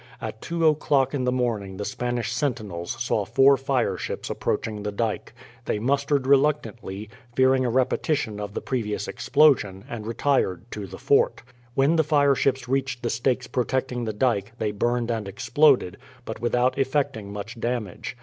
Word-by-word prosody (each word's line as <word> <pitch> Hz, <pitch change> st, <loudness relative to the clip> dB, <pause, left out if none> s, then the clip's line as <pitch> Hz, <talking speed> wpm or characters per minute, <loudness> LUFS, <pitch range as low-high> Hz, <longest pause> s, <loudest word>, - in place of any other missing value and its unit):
At 110 Hz, -, -6 dB
two 170 Hz, -1 st, -1 dB
o'clock 145 Hz, -3 st, +3 dB
in 130 Hz, -3 st, -1 dB
the 125 Hz, -, +2 dB
morning 110 Hz, -7 st, -1 dB
the 105 Hz, -, -4 dB
Spanish 120 Hz, -1 st, -2 dB
sentinels 110 Hz, -10 st, -2 dB
saw -, -, 0 dB
four 135 Hz, +1 st, +5 dB
fireships 125 Hz, -8 st, -2 dB
approaching 105 Hz, -2 st, -2 dB
the 105 Hz, 0 st, -3 dB
dyke. 110 Hz, +1 st, -2 dB, 0.3 s
They -, -, 0 dB
mustered 140 Hz, +3 st, +1 dB
reluctantly, 115 Hz, -8 st, +1 dB, 0.3 s
fearing 130 Hz, 0 st, +4 dB
a -, -, +1 dB
repetition 125 Hz, -2 st, 0 dB
of 105 Hz, 0 st, -6 dB
the -, -, -2 dB
previous 105 Hz, -5 st, -2 dB
explosion, 120 Hz, -7 st, +2 dB
and 115 Hz, -5 st, -6 dB
retired 115 Hz, -7 st, 0 dB
to 105 Hz, -2 st, -5 dB
the 95 Hz, +1 st, -9 dB
fort. 140 Hz, -, +2 dB, 0.3 s
When 140 Hz, +5 st, +3 dB
the 160 Hz, -, +4 dB
fireships 140 Hz, -4 st, +2 dB
reached 130 Hz, -1 st, -1 dB
the 120 Hz, -, 0 dB
stakes 125 Hz, +2 st, 0 dB
protecting 125 Hz, -1 st, -1 dB
the 110 Hz, -, -1 dB
dyke, 105 Hz, -2 st, 0 dB
they 110 Hz, -3 st, -1 dB
burned 120 Hz, +3 st, 0 dB
and 110 Hz, -3 st, -2 dB
exploded, 135 Hz, +1 st, +3 dB, 0.3 s
but 110 Hz, -, -6 dB
without 125 Hz, +2 st, +1 dB
effecting 130 Hz, -7 st, -1 dB
much 105 Hz, +4 st, -7 dB
damage. 120 Hz, 0 st, -3 dB
125 Hz, 160 wpm, -25 LUFS, 105-135 Hz, 0.3 s, four